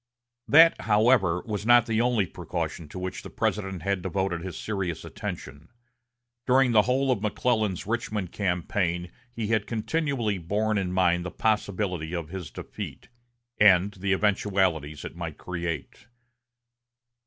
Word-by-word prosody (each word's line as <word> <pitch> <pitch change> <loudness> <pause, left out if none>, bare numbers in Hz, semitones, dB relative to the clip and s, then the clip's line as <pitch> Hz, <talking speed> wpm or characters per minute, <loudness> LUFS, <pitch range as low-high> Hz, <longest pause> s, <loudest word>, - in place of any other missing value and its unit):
That, 165 +3 +7
however, 105 -5 +3
was 105 -3 -3
not 120 +1 +6
the 115 -1 +1
only 120 -4 +2
precaution 80 -1 -5
to - - -9
which 90 0 -4
the - - -9
President 95 -5 -2
had 100 -1 0
devoted 95 -1 -2
his 90 -2 -6
serious 95 -6 -3
attention. 70 +4 -7 0.8
During 130 0 +4
the 110 -2 +6
whole 130 +4 +1
of 105 - 0
McClellan's 105 -3 0
Richmond 105 -4 -2
campaign 90 -2 -1 0.2
he 115 -2 -4
had 110 -2 +1
continually 120 - -1
borne 105 +5 0
in 90 -2 -2
mind 90 -1 +2
the 90 - -4
possibility 95 -5 -1
of 85 -3 -4
his 95 -1 -6
defeat, - - -8 0.5
and 100 -1 +6
the 100 0 -2
eventualities 95 -7 +1
it - - -7
might 85 -3 -6
create. 85 - -5
100 Hz, 140 wpm, -26 LUFS, 90-110 Hz, 0.8 s, That